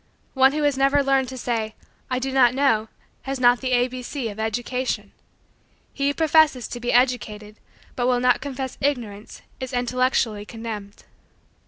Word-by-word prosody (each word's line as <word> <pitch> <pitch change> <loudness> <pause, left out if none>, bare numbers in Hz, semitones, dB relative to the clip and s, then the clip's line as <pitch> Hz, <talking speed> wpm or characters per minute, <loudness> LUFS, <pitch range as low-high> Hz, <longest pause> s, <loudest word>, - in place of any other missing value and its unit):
One 265 0 +5
who 305 0 -1
has 285 -2 +1
never 275 +1 +3
learned 270 -1 +2
to 260 - -7
say: 225 -3 -2 0.3
"I 255 - 0
do 265 +1 -2
not 255 -2 +4
know," 225 -6 +2 0.3
has 270 -1 -4
not 245 -1 +4
the 260 -1 -2
A 245 0 +3
B 255 0 -7
C 250 -1 -4
of 205 +1 -9
education. 225 -1 -2 0.8
He 275 0 -1
who 285 - 0
professes 315 -6 +3
to 240 - -6
be 240 0 -1
educated 215 -4 0 0.4
but 245 -1 0
will 250 -1 +2
not 250 0 +3
confess 265 -2 -5
Ignorance 235 -7 -3 0.2
is 260 -1 -6
intellectually 245 -3 0
condemned. 215 -2 -8
250 Hz, 170 wpm, -23 LUFS, 230-270 Hz, 0.8 s, One